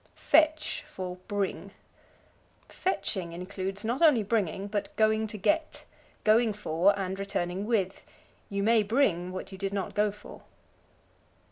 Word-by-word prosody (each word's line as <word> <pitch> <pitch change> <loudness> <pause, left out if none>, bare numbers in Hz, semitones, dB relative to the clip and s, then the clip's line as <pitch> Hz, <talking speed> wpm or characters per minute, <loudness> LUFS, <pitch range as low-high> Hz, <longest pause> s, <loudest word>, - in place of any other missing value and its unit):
Fetch 310 +1 +2
for 180 -1 -6
Bring. 205 -3 -2 1.0
Fetching 190 - -2
includes, 190 +3 -4
not 240 +6 -1
only 295 -10 +6
bringing, 200 -3 -1
but 205 0 -3
going 220 0 +2
to 210 0 -7
get 310 - 0 0.4
going 220 +1 +4
for 200 0 +2
and 190 0 -3
returning 195 0 -2
with. 195 -5 0 0.5
You 200 0 -1
may 225 +1 +5
bring 205 -6 +1
what 185 +1 -6
you 190 - -9
did 195 0 -2
not 200 -1 -3
go 210 0 +2
for. 210 +1 -11
205 Hz, 135 wpm, -29 LUFS, 190-220 Hz, 1.0 s, only